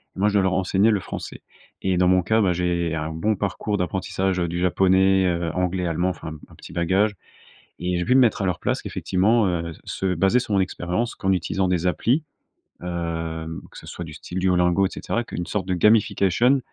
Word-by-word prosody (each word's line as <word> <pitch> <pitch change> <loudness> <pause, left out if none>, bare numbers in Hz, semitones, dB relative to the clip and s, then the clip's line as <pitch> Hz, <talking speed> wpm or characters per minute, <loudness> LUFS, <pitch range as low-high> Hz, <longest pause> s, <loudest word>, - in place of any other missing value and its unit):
Et - - -9
moi, 105 +2 +3
je - - -4
dois 100 - +4
leur 95 -1 +1
enseigner 95 +3 +2
le 105 -3 +2
français. - - -7 0.4
Et 95 -1 +1
dans 90 0 +3
mon 90 -1 +4
cas, 110 +3 +2
bah, 90 -3 +2
j'ai 85 -2 -1
un 75 0 -3
bon 105 +7 0
parcours 105 +1 -2
d'apprentissage, 95 +1 -1
heu, 85 - 0
du 85 +1 -3
japonais, 95 +2 +3
heu, 85 -2 -1
anglais, 90 0 -1
allemand, 85 +2 0
enfin 80 -3 -6 0.2
un - - -16
petit - - -12
bagage. 95 +5 +2 0.7
Et 90 0 -1
j'ai 90 - -1
pu 125 - +3
me 130 - +6
mettre 115 -4 +3
à 95 - 0
leur 90 - -1
place - - -2
effectivement, 105 +4 +1
heu, 85 -1 -2
se 95 -1 -2
baser 95 +8 +3
sur 110 -4 -2
mon 95 - +3
expérience 95 +5 -2
qu'en 95 -1 0
utilisant 95 +1 0
des 90 -1 0
applis. 125 - +1 0.6
Hem, 80 -2 -4
que - - -14
ce - - -11
soit 90 - -7
du 80 -2 -9
style 90 +4 -6
Duolingo 90 +1 +3
et - - -10
cetera, 120 +3 -3
qu'une 85 -6 -5
sorte 95 -3 -3
de 95 - 0
gamification 105 +5 +3
90 Hz, 215 wpm, -23 LUFS, 85-100 Hz, 0.7 s, me